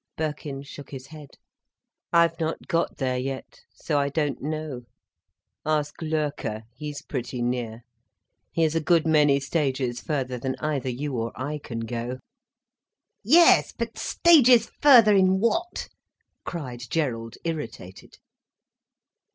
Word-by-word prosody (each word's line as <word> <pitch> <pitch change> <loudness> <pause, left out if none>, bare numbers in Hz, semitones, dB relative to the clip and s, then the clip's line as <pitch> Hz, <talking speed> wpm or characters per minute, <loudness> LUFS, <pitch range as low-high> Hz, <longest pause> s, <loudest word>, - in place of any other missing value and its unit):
Birkin 150 -3 -4
shook 140 0 -11
his 130 -2 -8
head. 150 -1 -13 0.7
"I've 170 -1 +3
not 160 0 -3
got 170 -3 0
there 130 -2 -1
yet, 135 +1 -6
so 150 -3 -1
I 140 0 +1
don't 145 -1 -1
know. 155 -3 -4 0.8
Ask 150 0 -1
Loerke, 150 -9 -2
he's 150 +2 -7
pretty 125 -2 -4
near. 120 -2 -3 0.7
He 165 - +1
is 160 -1 +2
a 165 - +1
good 165 +1 +3
many 150 -3 +4
stages 135 -4 -1
further 130 -5 -2
than 130 +2 -2
either 145 -4 -2
you 135 +2 -3
or 115 0 -2
I 150 +3 -3
can 115 -5 -6
go." 120 +2 -4 1.1
"Yes, 330 - +6
but - - -3
stages 255 -9 +5
further 240 -8 +8
in 190 0 +4
what?" 340 - -1 0.6
cried 130 -8 -6
Gerald, 115 -8 -2
irritated. 115 - -6
145 Hz, 125 wpm, -25 LUFS, 130-165 Hz, 1.1 s, further